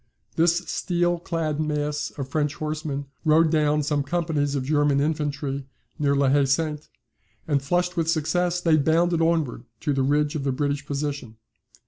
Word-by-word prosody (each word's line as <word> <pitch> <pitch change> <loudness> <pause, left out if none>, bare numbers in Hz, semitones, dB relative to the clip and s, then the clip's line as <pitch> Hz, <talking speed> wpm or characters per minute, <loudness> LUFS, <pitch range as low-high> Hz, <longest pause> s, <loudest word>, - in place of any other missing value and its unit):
This 170 +1 +3
steel 175 0 0
clad 165 -3 -2
mass 150 -1 -1
of 135 -2 -4
French 150 +1 -1
horsemen 150 -2 -3 0.2
rode 160 0 +4
down 150 -1 +2
some 145 0 0
companies 145 -2 -1
of 135 - -1
German 145 -1 +2
infantry, 140 -2 -2 0.3
near 140 -1 +2
La 140 0 +3
Haye 140 +1 +4
Sainte, 150 +2 -1 0.6
and 145 -3 +1
flushed 175 +5 0
with 165 -2 0
success, 175 +2 +1
they 165 -3 +3
bounded 165 +3 +2
onward 160 -8 0 0.2
to 150 -2 0
the 135 - 0
ridge 145 +2 +1
of 150 - -3
the 135 - 0
British 145 +1 -2
position. 140 -5 -4
150 Hz, 160 wpm, -24 LUFS, 140-165 Hz, 0.6 s, rode